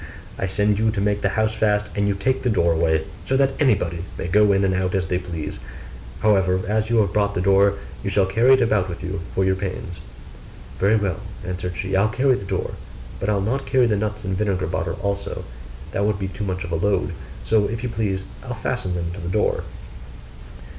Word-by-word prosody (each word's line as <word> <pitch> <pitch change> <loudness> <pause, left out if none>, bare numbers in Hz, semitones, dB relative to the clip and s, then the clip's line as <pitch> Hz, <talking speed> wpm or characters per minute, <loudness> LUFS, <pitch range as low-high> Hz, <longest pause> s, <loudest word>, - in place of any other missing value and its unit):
I 95 - -2
sent 105 +2 +1
you 110 0 +3
to 110 -2 -1
make 105 0 +1
the 100 - +2
house 110 0 +2
fast, 105 -1 +1
and 100 0 +1
you 100 - +1
take 130 +7 0
the 125 - +1
door 85 -6 +3
away, 80 -1 +2 0.2
so 135 - +2
that 135 0 +3
everybody 90 - +2
may 95 - -3
go 105 +3 +4
in 100 0 +3
and 95 - +2
out 95 0 0
as 90 -4 0
they 90 - +1
please 85 -7 -5 0.6
however, 95 -3 +3
as 110 +1 0
you 115 - +3
have 100 -2 0
brought 100 -1 +1
the - - 0
door, 100 +2 +4 0.3
you 100 - -1
shall 100 0 +3
carry 115 +7 +4
it 130 - +5
about 100 -5 +1
with 85 - -6
you 95 0 -3
for 95 - +2
your 95 - +3
pains.' 95 -2 -5 0.8
'Very 100 +3 +4
well,' 100 -7 -1 0.2
answered 90 -1 -4
she, 95 0 -2
'I'll 100 +3 +3
carry 130 +4 +3
the 100 - -3
door; 95 -1 -2 0.5
but 95 - -1
I'll 100 -2 +2
not 130 +7 -1
carry 130 -2 +4
the 110 -3 +2
nuts 105 +1 -2
and 95 -1 -2
vinegar 95 -2 0
bottle - - -2
also 100 0 -2 0.5
that 100 - 0
would 105 -1 +1
be 95 -1 -3
too 100 +2 -5
much 95 -1 -2
of 85 - -6
a - - +1
load; 100 +4 +1 0.3
so 105 - +3
if 115 +3 -4
you 125 - -1
please, 100 -4 -2 0.2
I'll - - -5
fasten 90 -1 -2
them 85 -1 -2
to 100 - -7
the 85 - -4
door. 105 +3 +1
100 Hz, 225 wpm, -22 LUFS, 95-105 Hz, 0.8 s, it